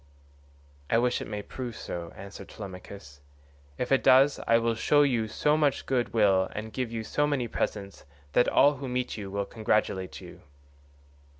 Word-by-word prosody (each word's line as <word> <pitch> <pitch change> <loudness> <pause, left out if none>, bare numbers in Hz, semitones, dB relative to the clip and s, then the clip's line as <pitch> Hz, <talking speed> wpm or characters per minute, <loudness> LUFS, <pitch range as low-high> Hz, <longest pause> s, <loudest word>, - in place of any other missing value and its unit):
"I 115 - +3
wish 125 +1 +1
it - - -6
may 105 -1 -5
prove 125 -1 -6
so," 85 -1 -6
answered 100 0 -10
Telemachus. 95 -6 -10 0.6
"If 125 - -3
it 135 - +4
does, 135 +2 +5
I 115 - +5
will 115 0 +1
show 145 +6 +3
you 120 -6 +1
so 150 +7 +1
much 145 -3 +1
good 125 -2 0
will 95 -4 +3
and 110 +1 -6
give 125 -3 -3
you 115 -1 -4
so 145 +6 0
many 135 -5 -1
presents 100 -3 -4 0.3
that 120 - +4
all 145 0 +4
who 135 0 -6
meet 125 0 -2
you 100 -3 -6
will 100 +1 -2
congratulate 105 -4 -1
you." - - -12
115 Hz, 175 wpm, -28 LUFS, 100-130 Hz, 0.6 s, does